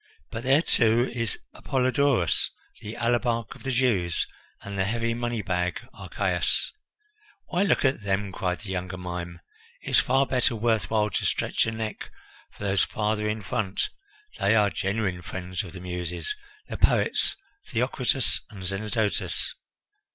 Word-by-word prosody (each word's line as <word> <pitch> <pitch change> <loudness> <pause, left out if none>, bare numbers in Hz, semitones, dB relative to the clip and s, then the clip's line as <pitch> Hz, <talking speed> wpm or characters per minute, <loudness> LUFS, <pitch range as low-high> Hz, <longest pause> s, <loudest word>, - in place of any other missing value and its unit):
"But 115 - -4
there, 135 +5 +4
too, 120 -2 +3
is 115 -4 -1 0.2
Apollodorus, 130 - +2 0.3
the 105 +2 -6
alabarch 120 -1 +1
of - - -15
the 135 - -3
Jews, 115 -10 +2 0.4
and 100 0 -6
the 95 - +2
heavy 115 +2 0
money 120 -2 -2
bag 90 -1 0
Archias - - 0 0.4
" 425 -1 -32
"Why 180 0 +1
look 200 -7 +3
at 130 -3 +2
them!" 100 0 0
cried 90 -1 -2
the 105 -2 -6
younger 90 0 -3
mime. 85 -1 -5 0.4
"It's - - +4
far 135 +2 +3
better 125 -2 +2
worth 110 -4 +1
while 105 -1 +2
to - - 0
stretch - - +1
your 110 0 -2
neck 110 -1 -4 0.4
for - - -10
those 100 -1 +3
farther 105 0 0
in 105 0 -2
front. 100 -2 -1 0.5
They - - +4
are 105 -2 +4
genuine 95 -2 -1
friends 90 0 -4
of 90 - -8
the 95 - -8
Muses 90 - -3 0.3
the - - -5
poets - - +3 0.3
Theocritus 125 +1 +2
and 100 -4 -9
Zenodotus." 105 +1 0
110 Hz, 150 wpm, -27 LUFS, 95-120 Hz, 0.5 s, there